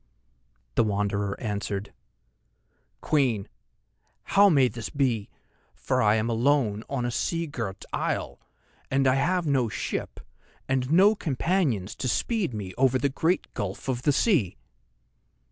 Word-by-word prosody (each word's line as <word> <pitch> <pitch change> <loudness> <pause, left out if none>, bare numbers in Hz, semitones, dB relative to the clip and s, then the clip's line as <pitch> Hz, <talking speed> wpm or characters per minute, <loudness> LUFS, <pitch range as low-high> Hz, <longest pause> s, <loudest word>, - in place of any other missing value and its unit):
The - - +3
Wanderer 100 -1 -1
answered: 105 -2 -4 1.1
"Queen, 125 -10 +1 0.8
how 200 +1 +5
may 140 -7 +5
this 115 -1 -6
be, 125 -7 0 0.5
for - - 0
I 105 0 +4
am 110 +1 0
alone 115 -2 +1
on 135 -3 -2
a 120 - -1
seagirt 130 - -3
isle, - - -2 0.5
and 135 0 +2
I 130 - +5
have 175 +6 +1
no 135 -6 +1
ship - - -4 0.5
and 130 0 0
no 195 +6 +6
companions 150 - -1
to - - -2
speed 210 - 0
me 100 -5 -6
over 130 -1 +4
the 140 +2 0
great 160 +7 -1
gulf 100 -1 -5
of 125 -2 -1
the 145 - +3
sea?" 140 - +2
130 Hz, 130 wpm, -26 LUFS, 105-145 Hz, 1.1 s, no